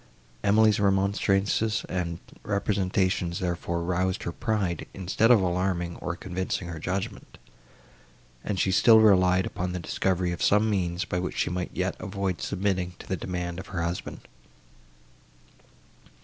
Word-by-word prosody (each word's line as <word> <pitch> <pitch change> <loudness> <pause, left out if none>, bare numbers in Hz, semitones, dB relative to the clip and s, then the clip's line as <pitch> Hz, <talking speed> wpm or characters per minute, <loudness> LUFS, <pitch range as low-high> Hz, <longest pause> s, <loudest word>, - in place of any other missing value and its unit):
Emily's 105 +1 +4
remonstrances 100 +2 +1
and 85 -2 -2 0.2
representations, 95 -3 0
therefore, 85 -1 -2
roused 90 +2 -1
her 85 - -3
pride, 100 -5 -2
instead 95 +4 +1
of 120 -3 +7
alarming, 90 -1 -1
or 90 - -4
convincing 95 -1 -3
her 80 -2 -6
judgment, 90 +4 -4 1.1
and 100 -3 -2
she 95 - +2
still 110 +4 +7
relied 95 -3 +5
upon 90 0 -3
the 90 - -3
discovery 90 +1 0
of 85 - -5
some 105 +2 +4
means, 90 -4 -1
by 90 - -2
which 90 - -4
she - - 0
might 90 0 -2
yet - - -2
avoid 95 -2 -3
submitting 95 -2 -1
to - - -11
the 95 - -1
demand 90 0 -4
of - - -8
her 85 -3 -3
husband. 85 +1 -4
95 Hz, 140 wpm, -27 LUFS, 90-100 Hz, 1.1 s, of